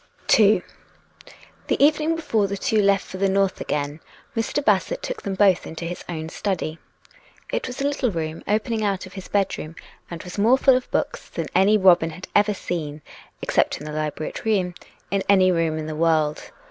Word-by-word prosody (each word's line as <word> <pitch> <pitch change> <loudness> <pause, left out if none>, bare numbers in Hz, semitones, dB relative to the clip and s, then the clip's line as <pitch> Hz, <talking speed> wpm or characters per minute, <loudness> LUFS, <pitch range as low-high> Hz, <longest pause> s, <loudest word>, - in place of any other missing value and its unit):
II 210 -5 +5 1.0
The - - +1
evening 310 +2 +2
before 225 -11 0
the 200 +1 -4
two 215 +2 +1
left 200 0 +3
for 185 - -8
the 195 +1 +1
north 195 0 +1
again, 145 +1 -2 0.4
Mr. 235 +5 -1
Bassett - - +1
took - - -4
them 195 -2 -3
both 190 -2 +3
into 165 +1 -6
his 175 +1 -5
own 160 -2 -4
study. 165 -4 -3 0.7
It - - -1
was 255 +1 -6
a 280 - +2
little 280 -3 0
room 160 -4 -4
opening 220 +1 0
out 195 -3 -1
of 185 - -13
his 190 -2 -8
bedroom, 190 -5 -1 0.3
and 170 -1 -7
was 180 +2 -7
more 235 +6 +5
full 265 -1 +5
of 255 - -2
books - - -2
than - - -4 0.4
Robin 175 -3 +6
had 180 +3 -9
ever 205 0 +4
seen, 155 -5 -5 0.4
except - - +1
in 150 - -10
the 150 - -5
library 155 0 -3
at - - -8
Rheims, 195 -5 +1 0.4
in 195 0 +1
any 190 -2 +5
room 165 -2 0
in 155 - -4
the 155 0 -5
world. 155 -2 +1
190 Hz, 190 wpm, -23 LUFS, 165-215 Hz, 1.0 s, Robin